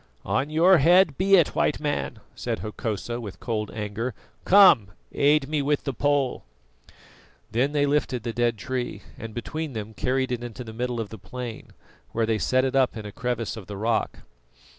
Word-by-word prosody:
"On 135 +3 0
your 170 +3 +5
head 175 +1 +5
be 195 +4 +4
it, 170 -5 +5
White - - +1
Man," 145 -6 -3
said 115 -2 -3
Hokosa, 110 +2 -4
with 100 -4 -8
cold 110 -3 -2
anger. 105 +3 -4 0.3
"Come, 185 - +7 0.3
aid 145 0 +3
me 150 0 0
with 145 +1 0
the 140 - -2
pole." 145 0 0 1.1
Then 125 +6 +1
they 145 -1 +3
lifted 140 -4 0
the 115 - -3
dead 120 -1 +1
tree, 120 -1 -4
and 110 -1 -8
between 155 +5 -4
them 110 -1 -6
carried 130 +3 -1
it 120 -1 -2
into 120 +1 -7
the 110 -2 -9
middle 120 +1 -2
of 110 -3 -4
the 110 - -9
plain, 125 -3 -8 0.4
where 115 0 +1
they 110 -1 0
set 130 +4 +2
it 135 0 -1
up 130 -3 +2
in 110 - -7
a 105 - -6
crevice 115 -1 -3
of 110 -4 -9
the 100 - -6
rock. 115 +2 -1
125 Hz, 185 wpm, -25 LUFS, 110-145 Hz, 1.1 s, Come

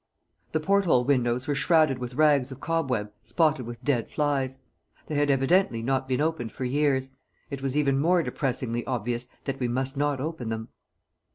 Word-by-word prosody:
The 155 - +2
port 200 +5 +2
hole 125 -8 +4
windows 125 -2 +1
were 145 - 0
shrouded 155 -3 +3
with 125 0 -6
rags 145 -3 +3
of 130 - -8
cobweb 130 -11 -1
spotted 150 -7 +1
with 120 -1 -8
dead 125 -6 0
flies. 135 -3 -1 0.5
They - - -6
had 145 0 +2
evidently 135 -2 +2
not 130 +1 0
been 130 -1 0
opened 155 -7 -1
for 130 - -4
years; 135 0 +1 0.4
it 140 -1 -5
was 135 +1 -1
even 140 -2 +2
more 170 +3 +3
depressingly 125 -5 -2
obvious 120 0 -2 0.2
that 135 -1 -4
we 125 - 0
must 130 +3 -2
not 145 -1 0
open 150 -5 -4
them. 110 0 -4
135 Hz, 180 wpm, -26 LUFS, 125-150 Hz, 0.5 s, hole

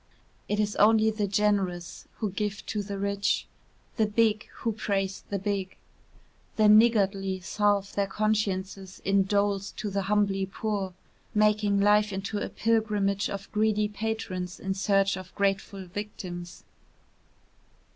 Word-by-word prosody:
It 210 - 0
is 210 -1 0
only 220 +1 +5
the 210 -1 -1
generous 195 -4 0
who 215 -3 -2
give 205 +1 -3
to 210 - -2
the 200 0 -5
rich, 200 0 0 0.5
the 220 -2 +3
big 215 0 +2
who 230 - -2
praise 195 -2 -2
the 200 - -1
big; 195 -1 -3 0.8
the 215 -1 +4
niggardly 200 -3 +4
salve 205 +1 +1
their 200 -1 0
consciences 195 -2 -1
in 195 0 +3
doles 200 0 +1
to 210 -2 -4
the 195 0 0
humbly 200 -2 +2
poor, 195 -2 -3 0.4
making 210 -1 +3
life 210 +1 +4
into 195 +2 -3
a - - -3
pilgrimage 210 -3 +1
of 195 0 -6
greedy 215 0 +2
patrons 205 -4 -4
in 190 0 -2
search 195 0 +2
of 185 0 -10
grateful 195 -1 -1
victims. 180 -2 -7
200 Hz, 135 wpm, -28 LUFS, 195-210 Hz, 0.8 s, only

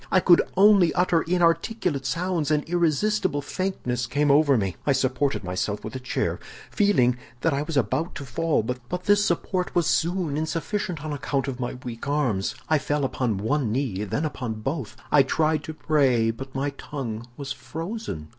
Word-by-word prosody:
I 190 - +5
could 175 -1 +6 0.2
only 195 -3 +6
utter 180 -2 +3
inarticulate 170 - +1
sounds, 165 +2 -1
and 150 -1 +2
irresistible 170 -1 +1
faintness 125 -12 -2
came 145 +3 +2
over 145 -2 +5
me. 95 -4 -1
I 140 - +2
supported 135 0 0
myself 95 +3 -2
by 110 - -5
a 130 - -4
chair, 130 - -2 0.3
feeling 125 -13 +3 0.2
that 165 - +2
I 140 - 0
was 155 0 -3
about 130 - 0
to 140 - -6
fall, 165 -3 0
but 125 +3 -3 0.2
this 205 0 +4
support 180 0 -1
was 175 -2 +3
soon 170 -3 0
insufficient 165 +1 -2
on 155 - -3
account 140 -1 -2
of 130 -2 -4
my 125 0 -3
weak 120 +2 -6
arms. 125 -10 0
I 155 -1 +3
fell 145 0 0
upon 125 -5 -1
one 115 +3 0
knee, 115 -6 -1
then 105 +10 -2
upon 120 -7 -4
both. 135 -2 -4
I 145 - +7
tried 155 +2 +1
to 160 - -5
pray, 135 -8 +2
but 135 +4 -9
my 140 +2 -1
tongue 120 -5 -5
was 140 -2 -5
frozen. 145 - -6
145 Hz, 175 wpm, -25 LUFS, 125-165 Hz, 0.3 s, I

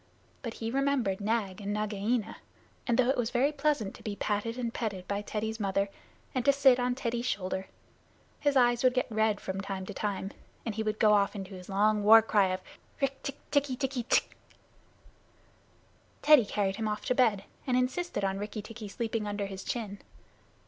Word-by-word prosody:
But 230 -4 -5
he 225 0 -4
remembered 265 -8 +1
Nag 210 -2 -1
and 200 0 -3
Nagaina, 215 +2 -1 0.5
and 235 -2 +2
though 255 0 +4
it - - -2
was 235 -2 0
very 260 +4 +2
pleasant 285 -8 0
to - - -13
be 210 -2 -4
patted 215 +3 -2
and 235 -2 -2
petted 195 -6 -3
by 200 0 -1
Teddy's 220 +2 -3
mother, 195 -1 0 0.4
and 255 - 0
to 280 - +6
sit 270 -2 +5
on 245 0 +1
Teddy's 240 -1 -2
shoulder, 190 -2 -2 0.7
his 285 -2 +2
eyes 240 -1 +4
would 255 0 +4
get 255 - +2
red 220 -1 +2
from 190 0 -4
time 195 -1 -4
to - - -6
time, 200 -1 -3 0.3
and 225 - -2
he 220 - -2
would 215 0 -1
go 215 -1 +5
off 200 0 +3
into 195 -1 -6
his 180 0 -10
long 210 +2 +3
war 220 +2 +9
cry 205 -3 +3
of 185 0 -2 0.4
"Rikk 275 -1 -1
tikk 275 - -5
tikki 285 -2 +2
tikki 260 -1 -2
tchk!" - - +3 2.0
Teddy 300 -6 +7
carried 200 -1 -1
him 220 - -1
off 210 0 -3
to - - +2
bed, 225 -6 +3 0.2
and 250 -1 +2
insisted 255 - -1
on 195 0 -1
Rikki 210 +1 -5
tikki 220 0 -8
sleeping 220 +1 -3
under 205 0 -2
his 195 -1 -7
chin. 210 -4 -4
220 Hz, 190 wpm, -30 LUFS, 200-250 Hz, 2.0 s, war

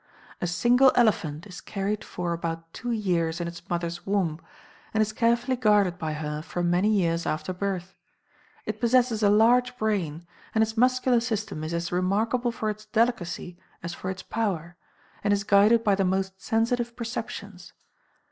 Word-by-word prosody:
A 175 - 0
single 245 +9 +4
elephant 170 -9 +2
is 185 -3 -10
carried 200 +2 -3
for 175 -1 -3
about 165 0 -5
two 245 - -5
years 175 -7 0
in 170 - -2
its 170 0 -10
mother's 170 0 -3
womb, 180 -6 -1 0.5
and - - +2
is 215 0 0
carefully 235 +3 +2
guarded 205 -7 +3
by 155 -1 -2
her 150 0 -4
for 175 +2 -4
many 175 +4 +2
years 170 -5 +1
after 155 +4 -2
birth; 190 -1 -3 0.7
it - - -4
possesses 240 -2 +3
a 205 - +5
large 245 +4 +4
brain, 175 -8 -1 0.3
and 220 - +5
its 220 0 -3
muscular 255 +1 +3
system 220 -8 -3
is 155 - -4
as 170 0 -2
remarkable 215 +7 +1
for 220 -2 -2
its 215 0 -10
delicacy 215 -6 -1 0.2
as 170 0 -4
for 185 - -5
its 190 0 -5
power, 175 -7 -2 0.5
and 205 0 +3
is 200 - -2
guided 210 +3 +5
by 205 -3 +3
the 195 0 +2
most 190 0 -1
sensitive 235 +1 0
perceptions. 210 -5 -6
200 Hz, 165 wpm, -26 LUFS, 175-225 Hz, 0.7 s, a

